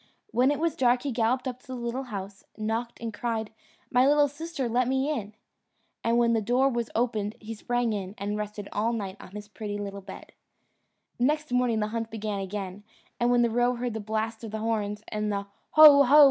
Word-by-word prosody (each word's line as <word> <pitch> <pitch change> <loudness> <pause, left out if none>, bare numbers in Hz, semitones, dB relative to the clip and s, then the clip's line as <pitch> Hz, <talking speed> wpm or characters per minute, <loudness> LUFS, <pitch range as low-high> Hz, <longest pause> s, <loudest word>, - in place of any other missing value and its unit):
When 255 +2 +3
it 290 - +1
was 330 +1 0
dark 245 -1 +3
he 280 - -1
galloped 250 +3 +1
up 250 -1 -4
to - - -24
the 260 - -5
little 240 +2 -3
house, 195 -3 -7
knocked, 225 +2 -3
and 230 -1 -5
cried, 220 0 -2 0.4
"My 250 +2 +5
little 290 0 +5
sister, 290 -2 -4
let 240 +1 +1
me 265 +3 +1
in." 215 -7 -4 0.7
And 230 +1 +2
when 235 -1 +4
the 225 - +2
door 245 +5 +3
was 235 -3 -2
opened 220 -3 0
he 225 +1 -7
sprang 240 +1 -1
in, 195 -1 -4
and 205 +1 -3
rested 210 -1 -5
all 225 +3 0
night 200 -4 -4
on 185 - -12
his 210 0 -7
pretty 210 -1 -5
little 200 -1 -5
bed. 190 0 -11 0.9
Next 300 +3 +1
morning 245 -3 +2
the 210 - -1
hunt 225 0 -3
began 215 -2 -3
again, 195 0 -5 0.4
and 240 0 +2
when 245 -1 +4
the 235 - +2
roe 245 +2 +2
heard 240 -1 -3
the 220 - -3
blast 220 +2 -3
of 225 - -5
the 220 - -4
horns, 215 -2 -2
and 210 0 -1
the 200 0 -2 0.3
"Ho! 300 -2 +10
ho!" 280 +3 +6
230 Hz, 215 wpm, -27 LUFS, 210-250 Hz, 0.9 s, Ho